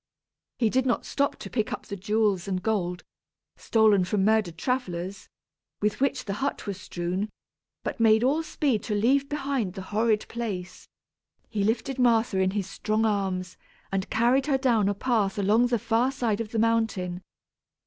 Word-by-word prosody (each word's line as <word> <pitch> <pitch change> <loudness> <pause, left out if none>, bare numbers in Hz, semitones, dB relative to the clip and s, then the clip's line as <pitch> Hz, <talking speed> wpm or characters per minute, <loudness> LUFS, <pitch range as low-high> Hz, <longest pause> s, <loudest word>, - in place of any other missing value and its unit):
He 225 -3 +2
did 260 0 +2
not 245 - 0
stop 280 0 0
to - - -9
pick 220 -4 -1
up - - -5
the 200 - -5
jewels 205 -2 0
and 185 -2 -2
gold, 180 -5 -1 0.5
stolen 215 -4 +3
from 190 +1 0
murdered 215 -6 +2
travellers, 195 -6 -3 0.5
with 210 +4 -1
which 275 -1 +1
the 200 - -2
hut 280 - -2
was 200 -1 -5
strewn, 180 +5 -3 0.5
but - - -4
made 220 0 +5
all 285 +5 +2
speed 285 -7 0
to 210 - -1
leave 270 +7 +2
behind 275 -9 -2
the 190 - -6
horrid 215 0 +2
place. 200 -7 -5 0.6
He 205 -3 -1
lifted 240 +5 -1
Martha 230 -5 +3
in 190 0 +3
his 195 -2 -1
strong 215 +3 -1
arms 190 -4 -1 0.3
and 195 -1 -2
carried 245 +5 +2
her 275 -3 +3
down 235 -7 +2
a 205 - -1
path 210 -4 0
along 210 +5 +3
the 240 -1 +1
far 235 +4 +1
side 230 -5 -1
of 220 - -5
the 230 - -2
mountain. 220 -6 0
220 Hz, 170 wpm, -26 LUFS, 195-240 Hz, 0.6 s, made